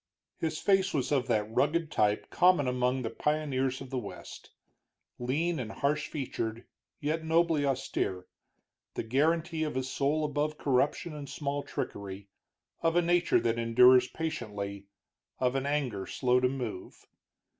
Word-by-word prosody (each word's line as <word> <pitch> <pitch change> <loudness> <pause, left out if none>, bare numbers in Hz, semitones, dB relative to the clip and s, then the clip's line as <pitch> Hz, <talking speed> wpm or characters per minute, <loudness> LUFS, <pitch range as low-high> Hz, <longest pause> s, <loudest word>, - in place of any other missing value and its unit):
His 160 -1 -1
face 195 -1 +2
was 135 -1 0
of 135 -3 +1
that 105 -1 +1
rugged 155 +5 +1
type 105 0 +1
common 180 -6 +4
among 125 +1 0
the 115 - -3
pioneers 135 -2 -1
of 130 - -9
the 130 - -1
West, 105 - -9 0.7
lean 150 +7 0
and 115 -3 -4
harsh 145 +5 0
featured, 115 -5 -4 0.3
yet 155 +2 -1
nobly 160 -2 +2
austere, 95 -8 -2 0.7
the - - -2
guarantee 160 +7 +1
of 150 -4 -2
a 130 - 0
soul 140 +4 0
above 150 +1 -1
corruption 140 +4 +1
and 145 -2 -7
small 145 -1 -2
trickery, 100 -5 -6 0.5
of 165 0 +2
a 175 - +4
nature 175 +1 +3
that 115 0 0
endures 125 +2 +6
patiently, 100 -11 -5 0.5
of 125 -1 +1
an 135 +1 -1
anger 130 -10 -1
slow 125 -1 +2
to 125 0 +2
move. 125 -8 -6
135 Hz, 145 wpm, -30 LUFS, 125-155 Hz, 0.7 s, endures